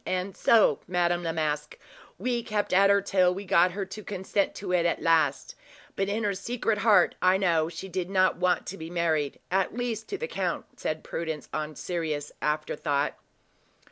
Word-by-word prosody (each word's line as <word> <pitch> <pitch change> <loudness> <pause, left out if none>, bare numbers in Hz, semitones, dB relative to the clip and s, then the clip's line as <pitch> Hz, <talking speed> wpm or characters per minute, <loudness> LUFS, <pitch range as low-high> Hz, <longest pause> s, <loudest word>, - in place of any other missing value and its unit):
And 185 +1 -2
so, 215 -10 +4
Madame 175 -1 +1
Masque, 150 -2 -2 0.4
we 245 -1 -1
kept 210 -4 -2
at 195 +2 +6
her 200 0 +5
till 185 -2 +3
we 200 +1 -6
got 180 -1 +4
her 195 0 -3
to 210 +3 -9
consent 195 0 -1
to 195 -2 -5
it 180 -2 +3
at 170 - +1
last; 160 -4 +2 0.4
but 195 0 -1
in 215 +2 -1
her 205 -1 +1
secret 220 +2 -2
heart, 210 0 +5
I 185 +1 +4
know 165 -4 +2
she 190 +2 -7
did 185 -1 -3
not 185 -1 +3
want 180 -2 +1
to 195 - -6
be 160 0 -7
married 160 -5 0
at 190 +4 0
least 235 -3 -3
to 395 - -3
the 475 - -4
count," - - -4
said - - -3
Prudence, 160 -4 -5
on 155 0 -3
serious 155 -4 -3
afterthought. 150 -1 -1
185 Hz, 180 wpm, -27 LUFS, 165-200 Hz, 0.4 s, at